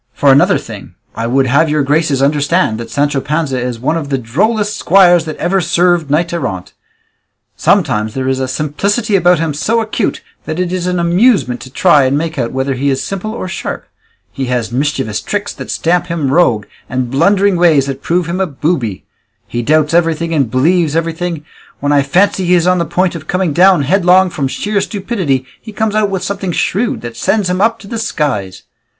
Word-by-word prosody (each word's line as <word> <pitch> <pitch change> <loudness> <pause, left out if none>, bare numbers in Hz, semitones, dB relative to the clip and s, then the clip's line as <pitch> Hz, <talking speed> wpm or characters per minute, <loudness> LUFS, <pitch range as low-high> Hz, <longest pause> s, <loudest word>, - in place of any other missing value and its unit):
For 140 - +4
another 140 +1 +4
thing; - - -10 0.2
I 115 +1 -3
would 135 +3 +2
have 140 +5 +2
your 150 -1 +1
graces 145 -1 +1
understand 145 -3 +1
that 115 -1 -7
Sancho 145 +3 0
Panza 150 -3 -2
is 125 -2 -4
one 145 +7 0
of 150 -4 -5
the 135 - 0
drollest 205 - -1
squires 175 -4 +4
that 155 - -6
ever 190 +2 0
served 175 -2 +1
knight 165 +4 0
errant; 95 - -4 0.8
sometimes 105 0 +1
there 130 -1 -2
is 130 0 0
a 130 - -1
simplicity 200 - -1
about 180 -1 +4
him 160 -1 -1
so 220 +10 0
acute 220 -1 -2 0.2
that 160 +2 -4
it 180 0 -1
is 180 -1 -2
an 180 0 0
amusement 175 - +2
to 130 - -10
try 150 -1 +3
and 135 +2 +1
make 160 -1 -3
out 120 -2 -1
whether 130 +1 -1
he 135 +2 -1
is 135 -1 -1
simple 195 +2 -4
or 205 - -5
sharp; - - -5 0.5
he 135 - -4
has 125 -3 -2
mischievous 135 -4 -2
tricks 205 0 -3
that - - -9
stamp 175 +1 0
him 160 -6 -2
rogue, 125 -12 +2 0.2
and 125 -1 -2
blundering 195 +7 +3
ways 165 -6 +3
that 135 0 -5
prove 175 +1 0
him 170 +3 -3
a 190 - +1
booby; 140 - -2 0.4
he 120 - -4
doubts 155 +4 +1
everything 165 -1 +1
and 140 -7 +1
believes 155 +5 +1
everything; 165 -1 -2 0.3
when 145 +1 -1
I 145 -1 +4
fancy 185 +6 +1
he 180 - +4
is 170 -1 +2
on 180 0 +2
the 170 - 0
point 180 +3 0
of 155 -2 -8
coming 180 -4 0
down 180 -1 +4
headlong 180 +3 +3
from 140 -4 -2
sheer 205 +9 -2
stupidity, 190 - -2 0.2
he 220 - -10
comes 215 0 -1
out 215 -1 +1
with 190 -2 -3
something 195 -2 -3
shrewd 220 +9 -1
that 120 -1 -7
sends 190 - 0
him 185 +1 -1
up 225 +2 +2
to 200 - -14
the 230 +2 -4
skies. 115 - -2
165 Hz, 205 wpm, -14 LUFS, 135-185 Hz, 0.8 s, For